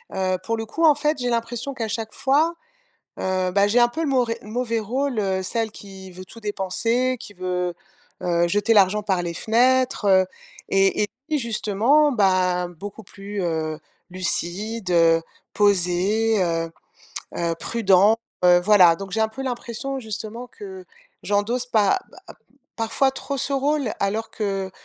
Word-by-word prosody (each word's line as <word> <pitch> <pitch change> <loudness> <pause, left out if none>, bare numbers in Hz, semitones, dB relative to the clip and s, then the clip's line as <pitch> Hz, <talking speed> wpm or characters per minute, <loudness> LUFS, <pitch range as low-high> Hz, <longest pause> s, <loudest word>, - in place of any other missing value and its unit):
Heu, 185 -1 0
pour 230 +3 -1
le 225 - -4
coup, 330 +8 0
en 305 - +7
fait, 300 +1 0
j'ai 245 -1 -1
l'impression 235 +3 -2
qu'à 230 -4 -3
chaque 220 0 -4
fois, 300 +5 +2 0.7
heu, 185 -1 0
bah, 200 +2 +3
j'ai 235 +4 +4
un 240 - +6
peu 315 +7 -4
le 325 - 0
mauvais 245 -4 +1
le 210 - -12
mauvais 230 0 -1
rôle, 250 +3 -2
heu, 190 -2 -1
celle 225 +3 -2
qui 190 -2 -11
veut 185 +1 -10
tout 230 +4 -13
dépenser, 230 +5 0
qui 205 - -10
veut, 180 -1 -2 0.5
heu, 170 -1 +2
jeter 205 +5 +2
l'argent 205 0 +4
par 190 -3 0
les 170 -1 -3
fenêtres, 250 +5 +2
heu 190 -1 +5 0.4
et 195 +1 +3
et - - -1 0.2
lui, 305 -1 +1
justement, 235 +6 +2
bah, 185 -5 +2
beaucoup 195 +5 -9
plus, 200 +1 -7
heu, 160 -2 -2 0.3
lucide, 185 +3 -3
heu, 165 -1 +4 0.3
posé, 205 +2 +2
heu, 165 -1 -1 0.7
heu, 170 -1 0
prudent. 205 0 +3 0.3
Heu, 175 0 +7
voilà, 180 -3 +6
donc 195 +1 -8
j'ai 220 - 0
un 220 - +2
peu 220 +5 -7
l'impression, 255 +1 -4
justement, 220 +1 -6
que 380 - -10 0.4
j'endosse 225 +5 0
pas 220 - +3 0.3
ba - - -11 0.4
parfois 230 +4 +1
trop 275 +1 -5
ce 275 +1 -2
rôle. 275 -2 0
Alors 215 +3 -1
que 195 -3 -3
210 Hz, 165 wpm, -23 LUFS, 185-240 Hz, 0.7 s, en